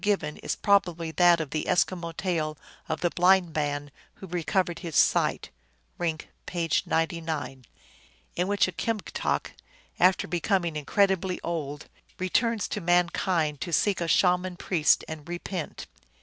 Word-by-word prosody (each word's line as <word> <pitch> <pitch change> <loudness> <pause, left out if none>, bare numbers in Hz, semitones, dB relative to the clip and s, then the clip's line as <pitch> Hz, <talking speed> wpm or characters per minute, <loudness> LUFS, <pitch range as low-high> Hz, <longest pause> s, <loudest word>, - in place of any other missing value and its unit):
given 195 -8 0
is - - -3
probably 175 -5 +1
that 175 +1 +5
of 155 -3 -4
the 155 - -2
Eskimo 175 -1 0
tale 155 -5 -1 0.3
of 160 0 -2
the 175 - +1
Blind 180 -1 +4
Man 145 -1 -2 0.2
who - - -10
recovered 175 0 -1
his 165 -5 -6
sight - - +2 0.5
(Rink, 160 -3 -2 0.2
page 165 -3 0
99), 160 -6 -2 0.7
in 180 +1 0
which 205 -1 +2
a - - -3
Kimgtok, 220 +1 -2 0.5
after 185 +1 +4
becoming 175 0 0
incredibly 190 +4 +1
old, 150 -3 -4 0.3
re 185 0 -2
turns 230 +1 +1
to 205 - -3
mankind 170 -3 +1
to 175 - -4
seek 195 +3 +2
a 170 - -1
Shaman 180 +1 +2
priest 170 -5 +2
and 155 0 -8
repent. 175 -1 -5
175 Hz, 140 wpm, -27 LUFS, 160-185 Hz, 0.7 s, that